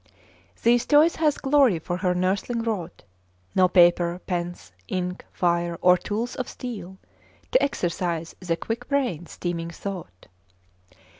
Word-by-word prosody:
' - - -31
'These 240 +1 +4
toys 305 +3 +5
hath 305 -2 +1
Glory 270 - +4
for 175 +2 -4
her 180 -1 0
nursling 200 +6 0
wrought! 195 -7 -4 0.5
No 185 -1 +5
paper, 175 -1 +4
pens, 175 - -4 0.2
ink, 180 0 -3
fire, 170 -1 0
or 180 0 +6
tools 220 +6 -3
of 255 - -3
steel, 195 -7 -7 0.5
To - - +4
exercise 170 - -1
the 170 -3 -1
quick 235 +5 -4
brain's 245 - -1
teeming 170 -1 -3
thought. 170 - -7
185 Hz, 135 wpm, -25 LUFS, 175-235 Hz, 0.5 s, or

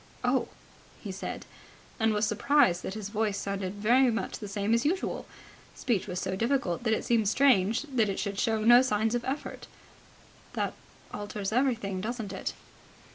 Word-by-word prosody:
"Oh!" - - +1 0.5
he 205 - -6
said, 190 - -6 0.5
and 220 0 +3
was 210 +1 +1
surprised 210 -4 +3
that 190 - -5
his 210 -2 -5
voice 210 -1 -1
sounded 195 -1 -3
very 245 +5 +4
much 225 - -3
the 210 - -6
same 200 +2 -1
as 235 +1 +3
usual. 360 +6 -1 0.5
Speech 220 -7 -1
was 180 -2 -3
so 190 - -2
difficult 230 -5 0
that 220 -2 +1
it - - -1
seemed 225 -4 +2
strange 230 -3 +3
that 255 -8 0
it 195 - -2
should 200 -1 -3
show 220 -1 +1
no 240 +2 +8
signs 220 -3 +1
of 240 -1 -1
effort. 270 +4 -5 0.9
"That - - -1 0.4
alters 205 -1 -4
everything, 225 -6 0
doesn't 220 -2 -4
it." - - -4
220 Hz, 170 wpm, -29 LUFS, 200-240 Hz, 0.9 s, no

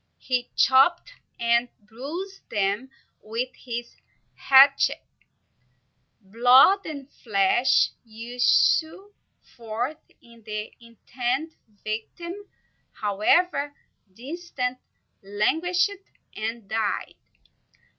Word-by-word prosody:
He 250 -1 -2
chopped 340 - +4 0.3
and 235 +1 +2
bruised 290 - -8
them 205 +5 -1 0.3
with 230 +4 -3
his 240 -1 -7 0.4
hatchet; 275 +1 +5 1.2
blood 245 - +5
and 285 -4 -7
flesh 215 0 +2
issued 245 - +1 0.4
forth; 240 +6 -4 0.2
and 235 -1 -19
the 215 0 -6
intended 245 +6 -4 0.3
victim, 225 +11 -5 0.6
however 285 - +1 0.4
distant, 255 - -5 0.4
languished 320 - 0 0.4
and 225 0 -5
died. 220 0 -2
245 Hz, 75 wpm, -25 LUFS, 220-290 Hz, 1.2 s, hatchet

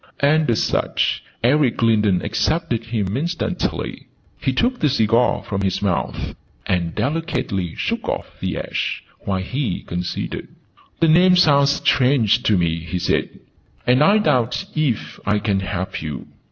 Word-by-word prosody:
And, 150 0 +3
as 115 - +2
such, - - 0 0.2
Eric 130 -1 +2
Lindon 105 -5 +3
accepted 155 -9 -1
him 105 -4 -2
instantly. 170 +5 -3 0.3
He 130 - 0
took 245 - 0
the 150 - +2
cigar 115 -2 +2
from 100 -1 -3
his 95 -1 0
mouth, 100 -4 -2 0.3
and 85 -3 -1
delicately 110 - -2
shook - - -2
off - - -5
the - - -2
ash, - - -3 0.2
while 95 -1 -2
he 125 -3 -3
considered. 90 0 -4 0.5
"The 165 - +5
name 180 +3 +6
sounds 140 -5 +5
strange 125 -4 +3
to 110 -6 +2
me," 85 -1 0
he 85 +2 -4
said. 90 - -1 0.4
"I 150 +12 +5
doubt 145 - +1
if 145 -8 -1
I 105 0 +1
can 105 -2 0
help 95 0 -4
you?' 75 -3 -5
115 Hz, 140 wpm, -21 LUFS, 95-145 Hz, 0.5 s, name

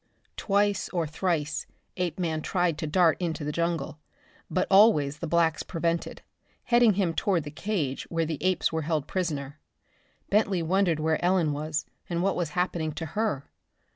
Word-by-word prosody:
Twice 205 0 +1
or 170 -3 -1
thrice 155 -1 -2 0.3
Apeman 170 -3 -2
tried 175 -2 0
to 155 - -2
dart 165 +2 +3
into 165 -3 -2
the 150 - -2
jungle, 170 -1 -2 0.5
but 185 - +1
always 155 -9 +5
the 165 - -4
blacks 165 -1 +2
prevented, 170 -1 -2 0.4
heading 240 -3 +4
him 185 -4 0
toward 180 -2 +1
the 145 - -7
cage 155 -6 -2
where 165 -1 0
the 155 -2 -4
apes 185 -2 +1
were 160 - 0
held 155 -2 -1
prisoners. 150 -7 -3 0.8
Bentley 200 -4 +2
wondered 175 -1 +2
where 160 +1 0
Ellen 175 -4 +2
was 155 +1 -2 0.2
and 170 0 -1
what 195 -1 +1
was 175 -4 -1
happening 170 -3 0
to 160 +2 -5
her. 205 -11 -2
170 Hz, 160 wpm, -27 LUFS, 155-185 Hz, 0.8 s, always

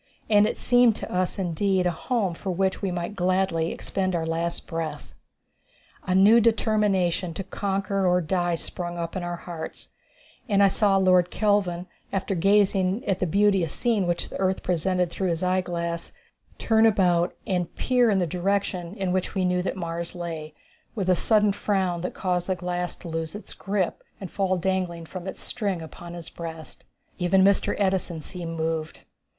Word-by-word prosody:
And 210 0 +6
it - - -3
seemed 245 -2 +4
to - - -7
us 180 +2 0
indeed 190 +1 0
a 180 - +3
home 195 +1 -1
for 190 +3 -6
which 190 +1 0
we 195 - -1
might 175 +2 -4
gladly 185 -3 +1
expend 185 -2 -2
our 165 -1 -1
last 165 +1 -2
breath. 165 -2 -5 0.9
A 185 - +2
new 205 +5 +7
determination 205 -6 +1
to 195 - -4
conquer 195 0 -1
or 180 0 +4
die 175 +1 0
sprung 175 +1 -4
up 170 +1 -4
in 185 - -2
our 175 0 -3
hearts, 170 -2 -8 0.6
and 200 -1 +4
I 200 - +6
saw 200 -1 +3
Lord 185 -2 +4
Kelvin, 195 -5 +1 0.3
after 195 0 -1
gazing 195 +3 +2
at 195 -2 0
the 180 - 0
beauteous 195 -2 +2
scene 220 -7 +1
which 175 -1 -1
the - - -7
earth 190 0 0
presented 180 0 0
through 190 - -2
his 170 +1 -1
eyeglass, 175 -2 -1 0.4
turn 225 0 +4
about 180 -5 +2
and 180 -5 -1
peer 250 -2 +3
in 200 - +3
the 180 - +2
direction 180 0 -1
in 190 -4 -2
which 185 +2 -1
we 190 -1 +1
knew 180 0 +1
that 190 - -3
Mars 170 0 -4
lay, 160 -3 -6 0.4
with 190 -4 +1
a - - +5
sudden 210 +2 +4
frown 190 -4 0
that 180 - -4
caused 180 -2 -1
the 190 - +1
glass 180 -1 -3
to - - -11
lose 165 +1 -4
its 210 - -8
grip 195 -2 -2 0.2
and 190 - -7
fall 190 -2 0
dangling 180 -2 -1
from 185 +2 -8
its - - -6
string 200 -7 -2
upon 170 +2 -9
his 170 -1 -7
breast. 165 -2 -8 0.3
Even 185 +2 +4
Mr. 200 0 +3
Edison 190 -5 0
seemed 165 -1 -6
moved. 160 -1 -2
185 Hz, 180 wpm, -25 LUFS, 170-195 Hz, 0.9 s, new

